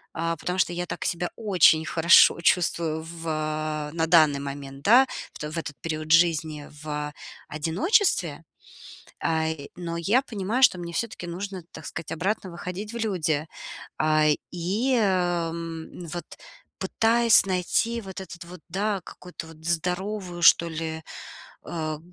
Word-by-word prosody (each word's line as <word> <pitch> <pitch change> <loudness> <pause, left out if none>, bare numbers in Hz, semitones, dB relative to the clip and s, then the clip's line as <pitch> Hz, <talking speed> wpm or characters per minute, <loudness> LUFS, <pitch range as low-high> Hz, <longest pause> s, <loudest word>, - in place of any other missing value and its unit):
А, 165 +1 -1
потому 180 +4 -3
что 175 - +2
я 175 +1 -3
так - - -5
себя 175 +1 -1
очень 180 -7 +4
хорошо 170 +1 +6
чувствую 165 -2 +1
в, 165 0 -9
а, 155 -1 -2
на 165 -1 0
данный 155 -4 +5
момент, 140 0 -7
да. 250 - +6 0.3
В - - -12
то, 150 0 -5
в 170 - -6
этот 150 -3 -4
период 155 -1 -4
жизни 160 -3 +3
в, 155 - -10
а 150 0 -3 0.3
одиночестве, 170 - +1 0.8
а, 160 -1 +1
и, 145 -3 -5
но 170 -2 -4
я 205 +10 +2
понимаю, 225 +1 -2
что 185 - +5
мне 170 -1 -6
всё-таки 190 -1 -3
нужно, 185 +1 -5
так - - -9
сказать, 160 -2 -6
обратно 185 +3 -2
выходить 180 +5 -6
в - - -7
люди. 165 -8 0 0.5
А, 155 0 +3 0.3
и, 200 +10 0
ам, 170 -3 -2
вот 175 - -4 0.5
пытаясь 230 0 +4
найти 195 +5 0
вот 190 -2 -8
этот 180 -2 -9
вот, 175 0 -11
да, 200 +2 -1
какую-то 180 -2 -10
вот 160 -1 -15
здоровую, 180 +2 -2
что 170 0 +7
ли, 160 0 -4 0.6
а, 155 -2 -4
170 Hz, 150 wpm, -26 LUFS, 160-190 Hz, 0.8 s, что